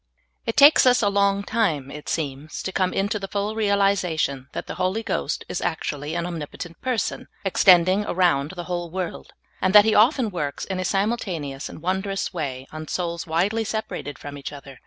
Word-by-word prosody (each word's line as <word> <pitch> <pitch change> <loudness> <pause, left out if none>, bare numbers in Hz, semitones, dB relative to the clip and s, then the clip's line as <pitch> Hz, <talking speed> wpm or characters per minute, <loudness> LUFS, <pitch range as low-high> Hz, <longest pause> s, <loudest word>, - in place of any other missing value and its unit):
IT 230 - -2
takes 285 -1 +8
us 250 -2 +5
a 205 - +4
long 200 0 +2
time, 170 - 0
it 150 0 -8
seems, 150 -1 -3
to 190 - -3
come 185 -1 +1
into 205 +2 -1
the 195 - -5
full 205 +2 -2
realization 195 -10 +1
that - - -5
the - - -6
Holy 190 +5 0
Ghost 185 -8 -2
is - - -3
actually 150 -3 -3
an 170 0 -1
Omnipotent 170 0 -7
person, 250 -6 -2 0.2
extending 185 +1 +5
around 170 -5 +1
the 175 - -5
whole 175 -1 -3
world, 185 0 -5 0.3
and 190 +2 +2
that 210 0 +10
He 220 - +3
often 230 +1 +4
works 150 -6 -3
in 190 -1 -3
a - - -1
simultaneous 180 - -2
and 155 - -11
won 185 +2 0
drous 195 -1 -3
way 135 -6 -4
on 155 0 -7
souls 170 -1 -3
widely 190 +8 +1
separated 210 -10 -4
from 145 0 -8
each 140 - -6
other. 140 -2 -11
185 Hz, 190 wpm, -24 LUFS, 155-200 Hz, 0.3 s, that